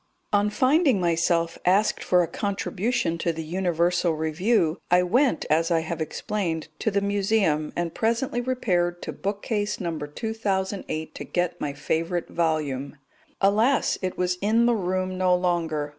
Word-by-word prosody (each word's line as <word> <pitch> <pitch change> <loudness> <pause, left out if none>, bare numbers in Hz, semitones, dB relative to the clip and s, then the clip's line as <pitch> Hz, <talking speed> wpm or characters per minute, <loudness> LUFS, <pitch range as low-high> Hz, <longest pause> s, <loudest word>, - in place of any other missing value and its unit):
On 205 0 +3
finding 265 - +3
myself 170 -1 +1
asked 195 +4 +2
for 180 -1 +3
a - - -2
contribution 200 -1 -1
to 170 - 0
the 160 0 -5
Universal 175 0 +1
Review, 160 +3 +1
I 180 +1 +5
went, 245 +9 +2
as 165 +2 +2
I 165 -2 +2
have 160 0 -4
explained, 165 -1 -3
to - - +1
the 200 -1 0
Museum, 200 -6 +1
and 170 -1 -2
presently 235 +2 0
repaired 180 -9 0
to - - -4
bookcase 205 +1 -2
No. 170 -3 -2
2008 190 -1 -3
to - - -7
get 175 -1 -2
my 145 - -2
favourite 165 +4 -2
volume. 150 -4 -1 0.4
Alas! 215 +7 +3
it 185 -1 -3
was 180 0 0
in 225 +3 +3
the 240 - +4
room 185 -1 -2
no 185 -1 +4
longer. 165 -4 -1
180 Hz, 150 wpm, -25 LUFS, 165-205 Hz, 0.4 s, I